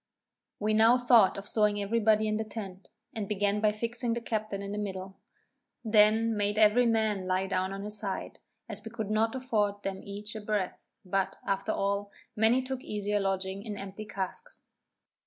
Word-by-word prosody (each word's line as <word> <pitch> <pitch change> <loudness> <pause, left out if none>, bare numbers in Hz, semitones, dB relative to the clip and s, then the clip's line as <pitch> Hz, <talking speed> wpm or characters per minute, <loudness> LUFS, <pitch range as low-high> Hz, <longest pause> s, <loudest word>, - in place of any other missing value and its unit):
We 215 +1 0
now 225 +3 +6
thought 240 -6 +5
of 195 - -6
stowing 210 -2 +2
every 205 +3 0
body 215 0 +3
in 215 0 0
the 220 - -1
tent, 200 -3 -8 0.2
and 215 -5 -4
began 205 0 0
by 215 -1 +4
fixing 235 +2 -2
the - - -1
captain 215 -3 -3
in 200 - -5
the 210 - -3
middle. 190 -1 -5 0.7
Then 220 +1 +4
made 205 0 0
every 220 +3 +5
man 215 -4 +1
lie 185 +1 +1
down 190 0 -1
on 195 0 -5
his 210 0 0
side, 195 -2 -4 0.3
as 215 -2 -7
we 225 - -6
could 220 -2 -4
not 225 +3 +1
afford 210 -6 0
them 195 -1 -3
each 205 +2 -7
a 215 - -5
breadth; 205 -3 -2 0.2
but, 195 +1 0
after 195 +2 0
all, 200 0 -1 0.2
many 225 +4 +3
took 260 0 -4
easier 205 0 -1
lodging 195 0 -2
in 210 -2 -5
empty 195 +2 -7
casks. 210 - -6
210 Hz, 185 wpm, -29 LUFS, 195-220 Hz, 0.7 s, now